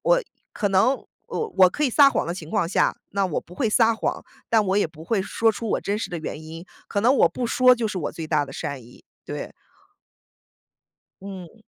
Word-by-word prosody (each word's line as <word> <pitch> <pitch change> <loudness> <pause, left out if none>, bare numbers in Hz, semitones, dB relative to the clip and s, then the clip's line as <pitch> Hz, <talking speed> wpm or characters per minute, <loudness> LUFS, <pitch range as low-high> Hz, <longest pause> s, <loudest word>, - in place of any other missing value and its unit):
我 - - +3 0.3
可 205 - 0
能 225 +8 +2 0.2
我 450 -2 -3
我 185 -1 +8
可 300 - -1
以 270 - +2
撒 280 +3 +7
谎 - - -1
的 170 - -2
情 165 -4 -9
况 200 -6 0
下， - - +2
那 200 0 0
我 175 - -2
不 175 - -15
会 230 +3 0
撒 225 0 +4
谎， - - -2 0.3
但 225 -2 +4
我 190 +1 +1
也 205 - +3
不 160 0 -14
会 200 +2 0
说 225 +3 +1
出 225 +2 -6
我 - - +1
真 205 +1 -2
实 - - -4
的 175 - -3
原 155 0 -6
因， 165 +2 -9 0.2
可 200 - -1
能 245 +5 +4
我 - - +5
不 245 - -3
说 255 +2 +5
就 230 -2 -2
是 205 - -5
我 155 - -3
最 160 - -6
大 155 -2 +1
的 135 - -11
善 140 -2 -5
意， 120 +2 -17 0.2
对。 - - -6 1.7
嗯。 195 +2 -10
200 Hz, 240 characters per minute, -24 LUFS, 165-230 Hz, 1.7 s, 我